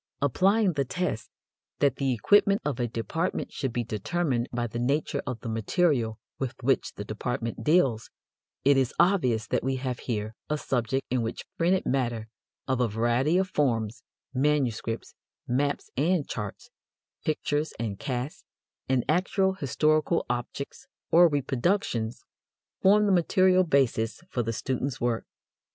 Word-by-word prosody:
Applying 190 Hz, -, +3 dB
the 140 Hz, -2 st, +1 dB
test 135 Hz, -5 st, -3 dB, 0.5 s
that 140 Hz, -3 st, +2 dB
the 135 Hz, -2 st, +1 dB
equipment 200 Hz, -, +4 dB
of 145 Hz, -5 st, -1 dB
a 120 Hz, -, +1 dB
department 120 Hz, -, -2 dB
should 135 Hz, -4 st, -2 dB
be 120 Hz, 0 st, -1 dB
determined 125 Hz, +3 st, -1 dB
by 120 Hz, 0 st, -1 dB
the 120 Hz, 0 st, -4 dB
nature 140 Hz, +5 st, 0 dB
of 125 Hz, -3 st, -4 dB
the -, -, -6 dB
material 115 Hz, -, +1 dB, 0.2 s
with 135 Hz, -3 st, -3 dB
which 135 Hz, 0 st, +1 dB
the 105 Hz, -, -6 dB
department 115 Hz, +2 st, -3 dB
deals, 140 Hz, -9 st, +3 dB, 0.6 s
it 140 Hz, 0 st, +6 dB
is 130 Hz, -2 st, +1 dB
obvious 155 Hz, -, +3 dB
that -, -, -1 dB
we 135 Hz, +1 st, 0 dB
have 130 Hz, -2 st, -3 dB
here 110 Hz, -2 st, -3 dB, 0.2 s
a 150 Hz, -, +1 dB
subject 130 Hz, -1 st, -1 dB
in 125 Hz, -1 st, +2 dB
which 115 Hz, 0 st, -4 dB
printed 180 Hz, +3 st, +2 dB
matter 120 Hz, -4 st, -1 dB, 0.4 s
of 130 Hz, -2 st, +1 dB
a 125 Hz, -, +3 dB
variety 120 Hz, -, +2 dB
of 190 Hz, 0 st, +1 dB
forms, 115 Hz, -, 0 dB, 0.3 s
manuscripts, 130 Hz, -5 st, 0 dB, 0.3 s
maps 140 Hz, +3 st, -1 dB
and 155 Hz, +3 st, +1 dB
charts, 105 Hz, -4 st, -6 dB, 0.5 s
pictures 150 Hz, 0 st, -1 dB
and 105 Hz, -4 st, -3 dB
casts, 130 Hz, +2 st, -4 dB, 0.5 s
and 130 Hz, -2 st, +2 dB
actual 190 Hz, +3 st, +2 dB
historical 155 Hz, +1 st, +1 dB
objects 125 Hz, +3 st, -4 dB, 0.2 s
or 175 Hz, +1 st, +8 dB
reproductions, 135 Hz, -, -1 dB, 0.6 s
form 210 Hz, +2 st, +5 dB
the 200 Hz, -, +3 dB
material 185 Hz, +1 st, +4 dB
basis 130 Hz, -8 st, +1 dB
for 125 Hz, -, 0 dB
the 115 Hz, -1 st, -2 dB
student's 130 Hz, +3 st, -2 dB
work. 120 Hz, -2 st, -1 dB
130 Hz, 145 wpm, -27 LUFS, 120-155 Hz, 0.6 s, or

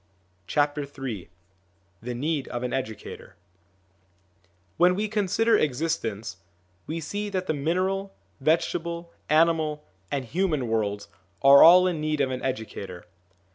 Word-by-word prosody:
Ill 145 Hz, 0 st, +5 dB, 1.3 s
THE 120 Hz, +1 st, -5 dB
NEED 145 Hz, +2 st, -2 dB
OF 120 Hz, 0 st, -4 dB
AN 125 Hz, -, -3 dB
EDUCATOR 110 Hz, -9 st, -6 dB, 1.4 s
WHEN 180 Hz, +1 st, +5 dB
we 210 Hz, +3 st, -1 dB
consider 215 Hz, +2 st, +2 dB
existence, 120 Hz, -, -1 dB, 0.5 s
we 160 Hz, +2 st, -3 dB
see 205 Hz, +7 st, -4 dB
that 185 Hz, -2 st, -2 dB
the 155 Hz, -, 0 dB
mineral, 185 Hz, +6 st, -1 dB, 0.3 s
vegetable, 170 Hz, +3 st, -1 dB, 0.2 s
animal, 155 Hz, -1 st, +2 dB, 0.2 s
and 140 Hz, -2 st, -2 dB
human 155 Hz, -2 st, -1 dB
worlds 105 Hz, -2 st, -1 dB, 0.4 s
are 140 Hz, +1 st, +9 dB
all 180 Hz, +2 st, +9 dB
in 175 Hz, -4 st, -1 dB
need 155 Hz, -1 st, -1 dB
of 135 Hz, -2 st, +1 dB
an 130 Hz, -, -4 dB
educator. 110 Hz, -8 st, -5 dB
155 Hz, 120 wpm, -26 LUFS, 130-175 Hz, 1.4 s, are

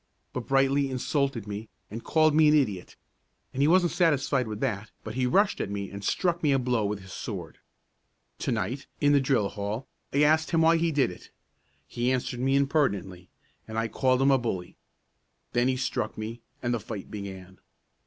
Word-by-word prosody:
But 125 Hz, -2 st, -5 dB
Brightly 135 Hz, +1 st, +3 dB
insulted 130 Hz, -2 st, -1 dB
me, 105 Hz, +2 st, -6 dB, 0.2 s
and 115 Hz, +2 st, -6 dB
called 155 Hz, -1 st, +3 dB
me 155 Hz, 0 st, +5 dB
an 150 Hz, -, +5 dB
idiot; 105 Hz, -11 st, 0 dB, 0.6 s
and 135 Hz, -, -2 dB
he 145 Hz, -, +5 dB
wasn't 175 Hz, +1 st, +4 dB
satisfied 140 Hz, -7 st, +2 dB
with 105 Hz, -1 st, -5 dB
that, 110 Hz, -5 st, -2 dB
but 110 Hz, -, -6 dB
he 125 Hz, +1 st, 0 dB
rushed 195 Hz, +10 st, +2 dB
at -, -, -3 dB
me 100 Hz, -1 st, -4 dB
and 100 Hz, 0 st, -8 dB
struck 175 Hz, -, 0 dB
me 150 Hz, -, +3 dB
a 135 Hz, -, +4 dB
blow 125 Hz, -3 st, 0 dB
with 100 Hz, 0 st, -2 dB
his 95 Hz, 0 st, -11 dB
sword. -, -, -6 dB, 0.8 s
To -, -, -1 dB
night, 115 Hz, +5 st, -2 dB
in 145 Hz, -1 st, +4 dB
the 140 Hz, -1 st, +5 dB
drill 125 Hz, -7 st, +1 dB
hall, 105 Hz, +5 st, -4 dB, 0.2 s
I 140 Hz, +2 st, +3 dB
asked 155 Hz, +1 st, +3 dB
him 165 Hz, -2 st, +2 dB
why 165 Hz, +1 st, +5 dB
he 165 Hz, 0 st, +1 dB
did 140 Hz, -8 st, +2 dB
it. 90 Hz, -, -13 dB, 0.6 s
He 120 Hz, -, -1 dB
answered 125 Hz, -1 st, -2 dB
me 135 Hz, +2 st, +2 dB
impertinently, 100 Hz, -, 0 dB, 0.4 s
and 110 Hz, 0 st, -6 dB
I 115 Hz, 0 st, 0 dB
called 130 Hz, +2 st, +2 dB
him 135 Hz, -, +5 dB
a 135 Hz, -, +4 dB
bully. 95 Hz, -7 st, -4 dB, 0.8 s
Then 120 Hz, +1 st, +3 dB
he 130 Hz, 0 st, +1 dB
struck 130 Hz, -, -2 dB
me, 110 Hz, +2 st, -6 dB, 0.2 s
and 120 Hz, 0 st, 0 dB
the 120 Hz, -, 0 dB
fight 105 Hz, -2 st, -7 dB
began. 95 Hz, -2 st, -8 dB
125 Hz, 195 wpm, -27 LUFS, 105-140 Hz, 0.8 s, me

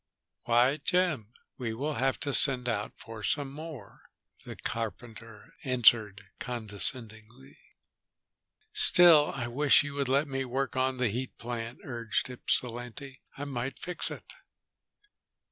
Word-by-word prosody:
"Why, 120 Hz, +4 st, +3 dB
Jim, 155 Hz, -, -1 dB, 0.3 s
we 115 Hz, -3 st, -4 dB
will 145 Hz, +6 st, -3 dB
have 135 Hz, -1 st, -1 dB
to 140 Hz, -, -2 dB
send 130 Hz, -3 st, +7 dB
out 105 Hz, -3 st, -3 dB
for 115 Hz, -1 st, -10 dB
some 140 Hz, +6 st, -2 dB
more," 150 Hz, -7 st, -10 dB, 0.4 s
the -, -, -8 dB
carpenter 115 Hz, -1 st, -7 dB
answered 115 Hz, -6 st, +3 dB, 0.2 s
condescendingly. 120 Hz, +2 st, -4 dB, 1.1 s
"Still, 175 Hz, -, +7 dB
I 120 Hz, -, -4 dB
wish 145 Hz, +4 st, +3 dB
you 145 Hz, -1 st, -7 dB
would 140 Hz, -2 st, -2 dB
let 140 Hz, +3 st, +1 dB
me 135 Hz, -1 st, -3 dB
work 130 Hz, +2 st, -3 dB
on 130 Hz, 0 st, 0 dB
that 125 Hz, -2 st, 0 dB
heat 125 Hz, +5 st, -5 dB
plant," 115 Hz, 0 st, -7 dB
urged 115 Hz, 0 st, -3 dB
Ypsilanti. 125 Hz, +2 st, -5 dB, 0.2 s
"I 145 Hz, -, -5 dB
might 130 Hz, -1 st, -5 dB
fix 180 Hz, -, -4 dB
it." -, -, -10 dB
125 Hz, 130 wpm, -28 LUFS, 115-140 Hz, 1.1 s, send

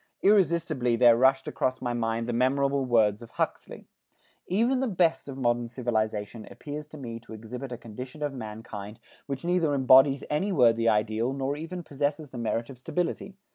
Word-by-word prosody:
Irresistibly 170 Hz, -, +3 dB
there 120 Hz, -1 st, +6 dB
rushed 135 Hz, +2 st, +3 dB
across 130 Hz, 0 st, -1 dB
my 120 Hz, -1 st, -2 dB
mind 115 Hz, 0 st, -1 dB
the 120 Hz, -, -2 dB
memorable 135 Hz, +2 st, +1 dB
words 110 Hz, -3 st, +2 dB
of 115 Hz, -, -11 dB
Huxley: -, -, -4 dB, 0.6 s
"Even 235 Hz, +8 st, +2 dB
the 265 Hz, -, 0 dB
best 175 Hz, -8 st, +1 dB
of 135 Hz, -1 st, -7 dB
modern 120 Hz, -2 st, 0 dB
civilization 110 Hz, -3 st, -2 dB
appears 150 Hz, 0 st, -7 dB
to 155 Hz, -, -11 dB
me 115 Hz, -4 st, -6 dB
to 115 Hz, -, -13 dB
exhibit 125 Hz, +4 st, -7 dB
a 120 Hz, -, -5 dB
condition 125 Hz, +6 st, -8 dB
of 145 Hz, -1 st, -2 dB
mankind 110 Hz, -3 st, -8 dB, 0.3 s
which 140 Hz, +2 st, -5 dB
neither 170 Hz, -4 st, +2 dB
embodies 135 Hz, +1 st, +5 dB
any 170 Hz, +8 st, 0 dB
worthy 115 Hz, -7 st, +4 dB
ideal 110 Hz, +4 st, +1 dB
nor 135 Hz, +1 st, -2 dB
even 170 Hz, +4 st, -6 dB
possesses 145 Hz, 0 st, -3 dB
the 125 Hz, -, -7 dB
merit 115 Hz, 0 st, -1 dB
of 125 Hz, -, -13 dB
stability. 180 Hz, +7 st, -3 dB
130 Hz, 175 wpm, -27 LUFS, 115-150 Hz, 0.6 s, there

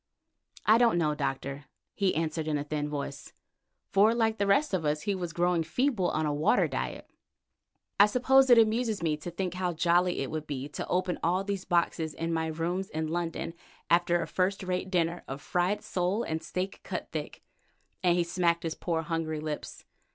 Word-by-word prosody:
"I 220 Hz, +2 st, +6 dB
don't 235 Hz, -7 st, +4 dB
know, 155 Hz, -3 st, +2 dB
Doctor," 140 Hz, 0 st, -3 dB, 0.3 s
he 195 Hz, -2 st, +1 dB
answered 160 Hz, 0 st, -1 dB
in 150 Hz, -1 st, +1 dB
a 145 Hz, -, -2 dB
thin 150 Hz, 0 st, -3 dB
voice, 145 Hz, -1 st, -5 dB, 0.6 s
for 210 Hz, +4 st, +5 dB
like 225 Hz, -1 st, +1 dB
the 200 Hz, -, +1 dB
rest 240 Hz, +6 st, +3 dB
of 180 Hz, -4 st, +1 dB
us 150 Hz, 0 st, 0 dB
he 205 Hz, -, 0 dB
was 180 Hz, -3 st, -4 dB
growing 175 Hz, 0 st, +1 dB
feeble 195 Hz, -, 0 dB
on 155 Hz, 0 st, 0 dB
a 150 Hz, -, 0 dB
water 155 Hz, +11 st, +3 dB
diet. -, -, -4 dB, 0.9 s
"I 205 Hz, -, +9 dB
suppose 265 Hz, +4 st, +4 dB
it 245 Hz, -, +8 dB
amuses 225 Hz, -2 st, +2 dB
me 155 Hz, -2 st, +1 dB
to 150 Hz, +3 st, -6 dB
think 180 Hz, +1 st, -3 dB
how 180 Hz, -1 st, -1 dB
jolly 175 Hz, +1 st, +2 dB
it 135 Hz, -, -3 dB
would 155 Hz, -1 st, -4 dB
be 140 Hz, -1 st, -4 dB
to -, -, -5 dB
open 180 Hz, -1 st, 0 dB
all 180 Hz, +3 st, +1 dB
these 200 Hz, -2 st, -3 dB
boxes 170 Hz, -2 st, 0 dB
in 165 Hz, +1 st, -2 dB
my 160 Hz, 0 st, 0 dB
rooms 170 Hz, +4 st, -2 dB
in 160 Hz, 0 st, -3 dB
London 165 Hz, 0 st, -3 dB, 0.4 s
after 175 Hz, 0 st, +3 dB
a -, -, -6 dB
first 190 Hz, +1 st, 0 dB
rate 185 Hz, 0 st, -2 dB
dinner 175 Hz, -2 st, 0 dB
of 135 Hz, +1 st, -5 dB
fried 180 Hz, +7 st, 0 dB
sole 185 Hz, +5 st, -1 dB
and 160 Hz, -5 st, -3 dB
steak 185 Hz, +2 st, -4 dB
cut -, -, -5 dB
thick," -, -, -6 dB, 0.6 s
and 175 Hz, -1 st, +3 dB
he 175 Hz, -, +3 dB
smacked 170 Hz, 0 st, +1 dB
his 165 Hz, -1 st, -2 dB
poor, 165 Hz, -2 st, -2 dB
hungry 160 Hz, -1 st, -2 dB
lips. 150 Hz, -1 st, -6 dB
175 Hz, 195 wpm, -29 LUFS, 160-190 Hz, 0.9 s, I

